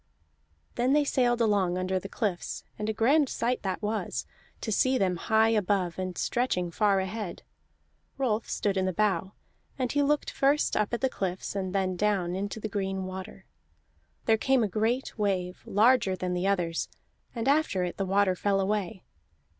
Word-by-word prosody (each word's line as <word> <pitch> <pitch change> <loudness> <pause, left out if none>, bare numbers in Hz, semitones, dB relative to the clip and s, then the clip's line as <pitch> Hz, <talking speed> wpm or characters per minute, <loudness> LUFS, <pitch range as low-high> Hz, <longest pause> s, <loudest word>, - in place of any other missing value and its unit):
Then 250 +3 +2
they 295 0 +4
sailed 245 -4 +1
along 200 -5 +2
under 185 +1 0
the 195 - -8
cliffs, 200 -6 -3 0.2
and 210 +1 -2
a - - +2
grand 265 +6 +3
sight 245 +2 -1
that 190 +1 -3
was, 215 +1 -2 0.4
to 220 - -3
see 260 +5 +3
them 185 -4 +1
high 220 +5 +3
above 195 -5 0
and 185 -1 -4
stretching 180 -8 0
far 200 +2 +2
ahead. 190 0 -4 0.7
Rolf 230 -5 0
stood 200 -2 0
in 190 0 +1
the 185 - -1
bow, 195 -1 0 0.4
and 255 -3 -1
he 290 - +2
looked 295 +1 +1
first 280 +2 +2
up 210 -1 +1
at 235 - -2
the 265 - +3
cliffs, 190 -3 -4
and 190 -2 -2
then 190 -1 0
down 190 -3 +1
into 200 +3 -3
the 215 - -3
green 195 -2 -2
water. 185 0 -7 0.8
There 220 -1 +3
came 265 -1 +3
a - - +2
great 225 +5 -1
wave, 185 -3 -1
larger 215 -2 +4
than 185 -1 -3
the 180 +2 0
others, 175 -4 0 0.5
and 230 +1 -2
after 280 -10 +2
it 180 - -4
the 195 - 0
water 195 -1 +3
fell 195 +1 +1
away. 195 -2 -1
205 Hz, 180 wpm, -28 LUFS, 185-230 Hz, 0.8 s, they